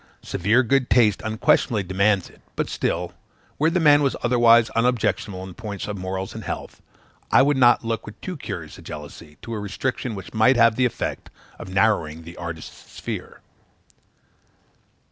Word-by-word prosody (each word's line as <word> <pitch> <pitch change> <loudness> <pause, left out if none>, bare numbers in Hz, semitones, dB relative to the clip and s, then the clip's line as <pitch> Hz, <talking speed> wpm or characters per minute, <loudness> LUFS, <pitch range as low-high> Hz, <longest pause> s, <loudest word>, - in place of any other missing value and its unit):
Severe 105 +7 +2
good 130 +1 +1
taste 110 -5 +4
unquestionably 110 0 +1
demands 95 +1 +1
it; - - -20
but - - -2
still, - - -2 0.4
where 155 +2 +3
the 180 +2 +1
man 145 -2 +6
was 140 -2 +1
otherwise 120 -1 +5
unobjectionable 115 -5 0
in 95 -1 -9
point 100 -1 -6
of 105 - -4
morals 95 0 -4
and - - -7
health, - - -6 0.5
I 135 - +6
would 145 +1 +2
not 120 -2 +4
look 115 -1 -3
with 105 +1 -10
too 185 - -6
curious 145 - -7
a - - -12
jealousy 75 +1 -10
to 115 - -6
a 110 - -3
restriction 110 +3 -3
which 95 -2 -9
might 110 +4 +4
have 115 -1 +5
the 130 +2 +2
effect 125 - -3 0.3
of 95 - -8
narrowing 95 -6 +1
the 85 +1 -11
artist's 85 -2 -8
sphere. - - -7
110 Hz, 165 wpm, -23 LUFS, 95-125 Hz, 0.5 s, man